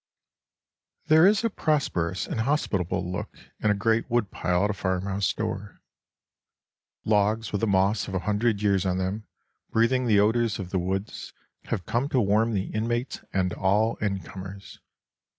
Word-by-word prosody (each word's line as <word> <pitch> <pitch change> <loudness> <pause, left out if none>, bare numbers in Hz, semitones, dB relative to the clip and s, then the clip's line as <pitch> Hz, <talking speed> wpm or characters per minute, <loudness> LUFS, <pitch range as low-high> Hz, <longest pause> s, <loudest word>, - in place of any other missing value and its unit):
There 160 +3 +7
is 210 +2 +3
a 230 - +2
prosperous 95 - 0
and - - -4
hospitable 95 - -1
look 90 - -5 0.2
in 105 - +1
a 105 - +3
great 115 +4 +1
woodpile 100 -6 0
at 105 - +2
a - - -3
farmhouse 95 +1 -1
door. 105 -2 -5 1.3
Logs 110 +1 +1
with 100 - -2
the 115 - +1
moss 100 +1 +2
of 95 - -5
a - - +1
hundred 105 0 +1
years 100 -3 +2
on 90 -1 0
them, 95 +3 -3 0.4
breathing 125 +3 +2
the 105 -3 +4
odors 115 +2 +2
of 90 -3 -6
the 95 - +1
woods, 95 +4 -4 0.3
have 95 -6 -3
come 125 +4 -1
to 130 - +2
warm 110 +2 +2
the 95 -1 -2
inmates 120 +4 -2
and 90 -2 0
all 105 +4 +1
in 100 -2 -1
comers. 95 +1 -10
105 Hz, 160 wpm, -26 LUFS, 95-115 Hz, 1.3 s, There